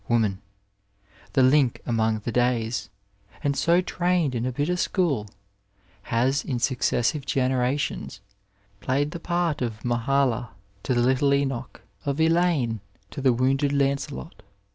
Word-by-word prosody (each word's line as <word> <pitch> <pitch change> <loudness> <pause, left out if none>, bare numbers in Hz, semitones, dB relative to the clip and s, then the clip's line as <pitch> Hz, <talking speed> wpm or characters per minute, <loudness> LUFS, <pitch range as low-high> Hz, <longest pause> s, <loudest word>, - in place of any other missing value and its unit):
Woman, 110 -5 +1 0.4
*' 100 0 -30
the 135 - +4
link 130 -1 +4
among 110 -2 0
the 115 - -3
days," 120 -1 0 0.5
and 140 -1 +1
so 170 +5 +3
trained 180 -5 0
in 120 0 -1
a - - -1
bitter 145 +8 -1
school, 165 - 0 0.7
has, 130 +4 +1
in 130 - -2
successive 130 +2 0
generations, 130 -2 -1 0.6
played 135 +7 0
the 170 - -6
part 170 -3 -1
of 115 -2 -4
Mahala 120 0 +1 0.3
to 130 - -1
the 120 - +3
little 130 +2 +3
Enoch, 135 -3 -3 0.2
of 140 +1 -2
Elaine 160 -8 +2 0.3
to - - -6
the 130 -1 +4
wounded 135 +4 +1
Lancelot. 140 - -2
130 Hz, 135 wpm, -25 LUFS, 120-145 Hz, 0.7 s, the